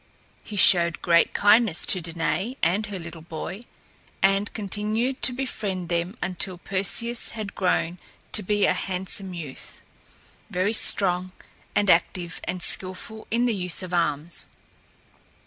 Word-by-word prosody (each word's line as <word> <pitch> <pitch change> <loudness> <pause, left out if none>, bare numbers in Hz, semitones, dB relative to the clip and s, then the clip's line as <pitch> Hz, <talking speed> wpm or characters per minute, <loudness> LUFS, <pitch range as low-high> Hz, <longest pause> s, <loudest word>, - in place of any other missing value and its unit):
He 210 - -8
showed 170 -4 +5
great 170 -1 +4
kindness 205 -3 +4
to 185 - +2
Danaë 170 - -2
and 195 +6 +2
her 200 -2 -5
little 170 -2 -8
boy, 165 +5 -6 0.6
and 195 +1 +3
continued 215 +5 -2
to - - +4
befriend 205 -9 -3
them 175 +5 -1
until 180 0 -2
Perseus 200 +6 0
had 210 -2 -5
grown 180 -2 0 0.3
to 215 - +2
be 205 +1 +2
a - - +3
handsome 190 0 -4
youth, 150 -6 -8 0.7
very 185 +4 0
strong 185 -4 +2 0.4
and 205 - +2
active 175 0 +2
and 180 0 -3
skilful 185 +4 -3
in 235 +2 +2
the 240 - +2
use 180 -2 +1
of 180 -1 -7
arms. 165 -1 0
185 Hz, 135 wpm, -25 LUFS, 175-210 Hz, 0.7 s, showed